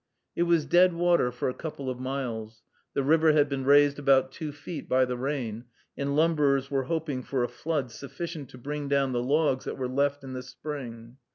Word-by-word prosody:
It 170 Hz, -, +2 dB
was 165 Hz, -3 st, +3 dB
deadwater 175 Hz, -5 st, +4 dB
for 125 Hz, -, -3 dB
a 130 Hz, -, -1 dB
couple 145 Hz, -3 st, -6 dB
of 130 Hz, -1 st, -3 dB
miles. 115 Hz, -5 st, -4 dB, 0.3 s
The 140 Hz, -, +1 dB
river 160 Hz, +2 st, +4 dB
had 145 Hz, -1 st, +4 dB
been 135 Hz, -2 st, -3 dB
raised 145 Hz, +1 st, +5 dB
about 135 Hz, -2 st, +3 dB
two 155 Hz, -4 st, -5 dB
feet 145 Hz, +2 st, -8 dB
by 130 Hz, 0 st, +4 dB
the 125 Hz, 0 st, -3 dB
rain, 125 Hz, -3 st, -3 dB, 0.3 s
and 140 Hz, 0 st, -2 dB
lumberers 145 Hz, -4 st, +2 dB
were 135 Hz, -2 st, 0 dB
hoping 155 Hz, -3 st, -2 dB
for 130 Hz, 0 st, -1 dB
a -, -, +1 dB
flood 150 Hz, -5 st, -3 dB
sufficient 150 Hz, +3 st, -7 dB
to -, -, -12 dB
bring 145 Hz, +3 st, -4 dB
down 140 Hz, -1 st, +2 dB
the 120 Hz, -1 st, 0 dB
logs 140 Hz, 0 st, +1 dB
that -, -, -4 dB
were 130 Hz, -2 st, -2 dB
left 140 Hz, +2 st, 0 dB
in 130 Hz, -1 st, -7 dB
the 130 Hz, -, -4 dB
spring. 125 Hz, -3 st, -8 dB
140 Hz, 200 wpm, -28 LUFS, 130-150 Hz, 0.3 s, raised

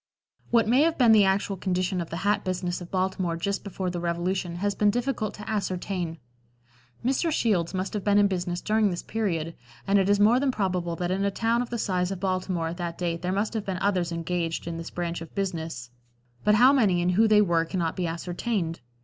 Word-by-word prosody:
What 230 Hz, -2 st, +3 dB
may 250 Hz, +5 st, +4 dB
have 325 Hz, +1 st, +2 dB
been 240 Hz, -4 st, +5 dB
the 210 Hz, -2 st, +6 dB
actual 195 Hz, +1 st, +1 dB
condition 185 Hz, 0 st, -1 dB
of 170 Hz, -, -6 dB
the 165 Hz, -, -4 dB
hat 205 Hz, 0 st, +2 dB
business 180 Hz, -1 st, -2 dB
of 175 Hz, -, -8 dB
Baltimore 185 Hz, -2 st, -1 dB
just 200 Hz, +4 st, -2 dB
before 190 Hz, -2 st, -3 dB
the 175 Hz, -, -4 dB
Revolution 175 Hz, +1 st, -2 dB
has 200 Hz, +3 st, -1 dB
been 210 Hz, +1 st, +3 dB
difficult 240 Hz, -1 st, -1 dB
to 210 Hz, -, -10 dB
ascertain. 185 Hz, -4 st, -2 dB, 0.9 s
Mr. 275 Hz, +6 st, +1 dB
Shields 195 Hz, -, +1 dB
must 185 Hz, +1 st, -2 dB
have 210 Hz, -2 st, -3 dB
been 205 Hz, -1 st, +3 dB
in 205 Hz, -, +6 dB
business 180 Hz, -2 st, -1 dB
during 215 Hz, -1 st, +2 dB
this 175 Hz, -2 st, -4 dB
period, 170 Hz, -7 st, -2 dB, 0.3 s
and 200 Hz, 0 st, +3 dB
it 195 Hz, 0 st, +1 dB
is 205 Hz, 0 st, +4 dB
more 220 Hz, +4 st, +5 dB
than 280 Hz, 0 st, +1 dB
probable 180 Hz, -7 st, -1 dB
that 175 Hz, +1 st, -2 dB
in 195 Hz, +1 st, 0 dB
a 200 Hz, -, +2 dB
town 230 Hz, +4 st, +1 dB
of 245 Hz, -, -4 dB
the 240 Hz, -, -3 dB
size 180 Hz, -4 st, 0 dB
of 195 Hz, -2 st, -4 dB
Baltimore 185 Hz, -3 st, -1 dB
at 170 Hz, -, -6 dB
that 170 Hz, -2 st, -4 dB
date 170 Hz, -2 st, -2 dB
there 180 Hz, +1 st, -1 dB
must 200 Hz, +4 st, -1 dB
have 220 Hz, -2 st, -2 dB
been 190 Hz, -2 st, -2 dB
others 185 Hz, -3 st, 0 dB
engaged 170 Hz, 0 st, -2 dB
in 170 Hz, 0 st, -4 dB
this 165 Hz, 0 st, -6 dB
branch 170 Hz, -1 st, -4 dB
of 165 Hz, -, -10 dB
business, 165 Hz, -10 st, -3 dB, 0.5 s
but 210 Hz, 0 st, +4 dB
how 255 Hz, +5 st, +6 dB
many 205 Hz, -10 st, +3 dB
and 180 Hz, -, +2 dB
who 220 Hz, +5 st, +4 dB
they 215 Hz, -1 st, +5 dB
were 170 Hz, -4 st, +2 dB
cannot 165 Hz, -1 st, -2 dB
be 180 Hz, -2 st, -1 dB
ascertained. 175 Hz, +1 st, -3 dB
185 Hz, 225 wpm, -26 LUFS, 175-210 Hz, 0.9 s, the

